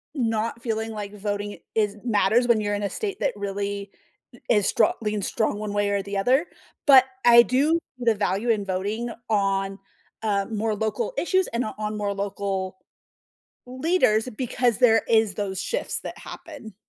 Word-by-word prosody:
not 230 -2 -1
feeling 225 -1 -2
like 210 -1 -6
voting 205 0 -4 0.2
is 210 -2 +1
matters 235 +1 +3
when 235 -2 +4
you're 205 0 -1
in 205 - -3
a 200 - 0
state 400 -3 -4
that 280 - +2
really 200 0 -3 0.5
i - - -18
is 205 -2 +3
stro 220 - +4
leans 210 -2 -1
strong 215 -2 0
one 210 -1 -4
way 205 0 +1
or 200 -1 0
the 200 0 -4
other, 260 - +3 0.4
but 270 -3 +9 0.2
I 235 0 +9
do 285 +7 +2 0.2
the 230 -3 +2
value 200 +3 -1
in 210 -3 +1
voting 205 +5 -2 0.2
on, 195 -2 0 0.4
uh, 200 -2 +1
more 215 0 -1
local 220 - -2
issues 375 +1 +2
and 235 +2 -1
o 215 - -5
on 215 0 -3
more 205 -1 -1
local 195 -1 -3 0.9
leaders 255 -4 +1
because 245 -1 0
there 225 -3 +5
is 220 -3 +3
those 195 -3 -3
shifts - - -2
that - - -7
happen. 285 - -10
215 Hz, 170 wpm, -24 LUFS, 200-240 Hz, 0.9 s, but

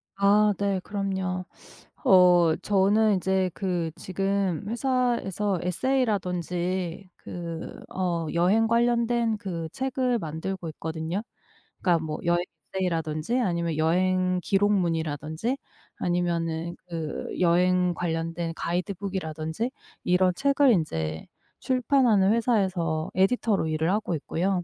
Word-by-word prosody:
아. 205 +1 +4
네. 200 -1 0
그럼요. 190 -2 -2 0.6
어. 180 -3 +6
저는 205 +1 +3
이제 190 0 +1
그 175 -4 -1
지금 195 0 -1
회사에서 235 -6 0
에세이라든지 180 - -1
그 170 -2 -6 0.4
어 175 -3 -1
여행 190 +7 +3
관련된 235 0 +2
그 170 -5 -4
책을 260 -2 0
만들고 165 +1 -4
있거든요. 160 +5 -4 0.6
그러니까 170 -3 +2
뭐 155 -1 -3
여행 175 0 +2 0.3
에세이라든지 165 +3 -1
아니면 170 -7 0
여행 185 +3 +2
기록문이라든지 170 - 0 0.4
아니면은 170 -1 -1
그 165 -3 -4
여행 180 +1 +3
관련된 165 0 -2
가이드북이라든지 180 +1 -3 0.3
이런 180 0 +3
책을 280 +1 +4
인제 80 - -1 0.3
출판하는 245 -6 +3
회사에서 185 -9 0
에디터로 195 -1 +2
일을 160 +2 0
하고 205 -4 0
있고요. 180 +4 -1
185 Hz, 265 characters per minute, -26 LUFS, 170-205 Hz, 0.6 s, 어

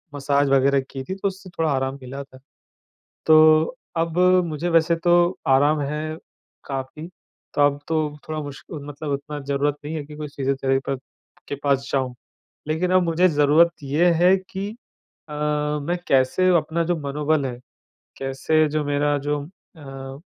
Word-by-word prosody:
Massage 140 0 +1
वगैरह 135 0 +4
की 135 -1 -5
थी, 190 - -5
तो 195 +1 -2
उससे 190 -1 -7
थोड़ा 165 -2 -1
आराम 135 0 -1
मिला 135 +2 -7
था। 130 -1 -17 0.9
तो 155 +4 +6 0.2
अब 165 +1 -1 0.3
मुझे 160 +2 -3
वैसे 165 0 +3
तो 175 +1 +4
आराम 145 +3 +4
है 150 +2 -3 0.5
काफ़ी, 135 +3 -5 0.5
तो - - 0
अब 145 0 0
तो 160 - +1 0.3
थोड़ा 155 0 -3
मुश्क 145 -1 -9 0.2
मतलब 145 +1 -6
उतना 145 +2 -4
ज़रूरत 140 +1 -1
नहीं 150 +2 -5
है 155 -2 -4
कि 150 +1 -11
कोई 150 0 -5
फिज़ियोथेरेपक 135 0 0 0.5
के - - -3
पास 140 -1 +1
जाऊँ। 130 -2 0 0.5
लेकिन 165 +4 0
अब 185 - +5
मुझे 170 +2 +3
ज़रूरत 150 +2 +4
ये 150 +6 +2
है 180 +3 +5
कि 190 +1 -6 0.6
अ, - - -7
मैं 150 +2 -1
कैसे 135 +7 +3
अपना 160 +1 -1
जो 175 +1 0
मनोबल 145 +1 0
है, 125 -2 -5 0.6
कैसे 135 +4 +1
जो 150 0 -1
मेरा 145 0 +1
जो 145 -1 0 0.3
अ, 135 -2 -9
150 Hz, 155 wpm, -23 LUFS, 140-160 Hz, 0.9 s, तो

